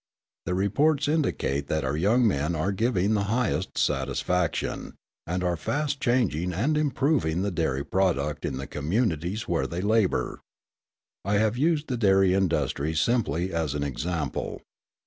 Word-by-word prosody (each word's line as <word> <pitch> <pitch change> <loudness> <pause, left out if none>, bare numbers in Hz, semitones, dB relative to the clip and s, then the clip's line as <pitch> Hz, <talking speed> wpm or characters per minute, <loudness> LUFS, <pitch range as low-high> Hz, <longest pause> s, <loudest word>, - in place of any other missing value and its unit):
The 90 - 0
reports 140 +10 +2
indicate 135 - 0
that 80 -1 -1
our 65 +2 -1
young 110 +9 +3
men 75 -2 0
are 90 +6 0
giving 105 -1 +1
the 100 -1 +1
highest 110 -3 -1
satisfaction, 90 -2 -1 0.3
and 90 +2 -1
are 90 -1 +1
fast 145 - -2
changing 105 - +1
and 125 - +1
improving 135 - +1
the 100 - -1
dairy 70 -6 -1
product 75 -6 0
in 65 - -2
the 70 - -5
communities 85 - -1
where 85 - 0
they 85 +2 -4
labour. 105 - +1 0.8
I 100 +2 0
have 110 +2 +2
used 155 +3 +1
the 125 - -2
dairy 95 -4 +4
industry 80 -5 0
simply 95 - 0
as 80 -4 -1
an 70 - -1
example. 80 +4 -3
95 Hz, 145 wpm, -26 LUFS, 80-115 Hz, 0.8 s, dairy